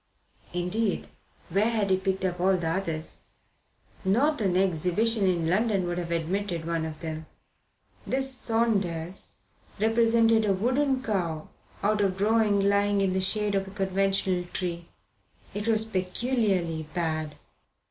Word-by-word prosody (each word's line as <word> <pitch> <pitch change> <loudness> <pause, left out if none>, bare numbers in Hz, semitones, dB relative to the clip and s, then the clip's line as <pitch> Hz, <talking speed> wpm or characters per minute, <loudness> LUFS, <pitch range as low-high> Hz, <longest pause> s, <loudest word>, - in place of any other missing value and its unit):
Indeed, 180 +4 -1 0.4
where 200 +6 +2
had 215 -4 0
he 190 - +4
picked 190 0 -1
up 180 -1 -2
all 190 +1 +3
the 170 -2 -2
others? 165 -3 -2 0.8
Not 240 +9 +2
an 185 -3 +2
exhibition 190 +4 +2
in 170 -3 +1
London 200 +1 +2
would 175 0 -2
have 170 -1 -4
admitted 170 +1 -2
one 165 -1 -1
of 155 -1 -7
them. 160 -1 -5 0.8
This 265 0 +2
"Saunders" 200 -8 0 0.5
represented 225 0 +4
a 200 - +3
wooden 260 +6 +1
cow 175 -9 -2 0.3
out 210 +1 +2
of 190 -2 +1
drawing 210 0 +3
lying 200 0 +2
in 195 -1 +1
the 190 - +1
shade 210 +2 0
of 195 -1 0
a - - -7
conventional 195 -2 0
tree. 170 -2 -3 0.7
It 205 +2 -3
was 220 -1 +3
peculiarly 185 -5 -1
bad. 155 -3 -2
195 Hz, 135 wpm, -27 LUFS, 175-220 Hz, 0.8 s, he